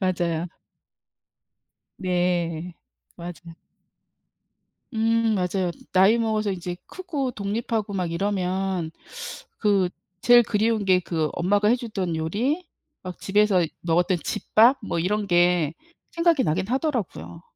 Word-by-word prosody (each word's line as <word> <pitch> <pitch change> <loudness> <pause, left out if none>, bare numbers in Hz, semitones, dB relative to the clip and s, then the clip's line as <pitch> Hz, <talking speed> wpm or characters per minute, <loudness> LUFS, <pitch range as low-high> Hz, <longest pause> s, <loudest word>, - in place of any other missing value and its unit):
맞아요. 175 -3 0 1.5
네, 175 -2 -1 0.4
맞아요. 170 -1 -9 1.4
음 225 0 +2
맞아요. 180 -1 0 0.2
나이 195 +5 +5
먹어서 215 -2 0
이제 180 -1 -4
크고 295 -9 -3
독립하고 210 0 -2
막 180 -3 -2
이러면 185 -2 -1 0.7
그 200 -4 +2 0.3
제일 240 0 +7
그리운 220 0 +1
게 185 -1 +4
그 160 -3 -1
엄마가 205 +4 +2
해 240 - +5
주던 200 -8 -3
요리 245 - -1 0.4
막 180 -1 -7
집에서 200 -3 +3 0.2
먹었던 175 +2 +2
집밥? 240 +5 +3
뭐 170 - -2
이런 205 +4 0
게 175 -3 +3 0.4
생각이 335 -5 +3
나긴 185 +4 0
하더라고요. 250 - -2
190 Hz, 230 characters per minute, -24 LUFS, 175-220 Hz, 1.5 s, 제일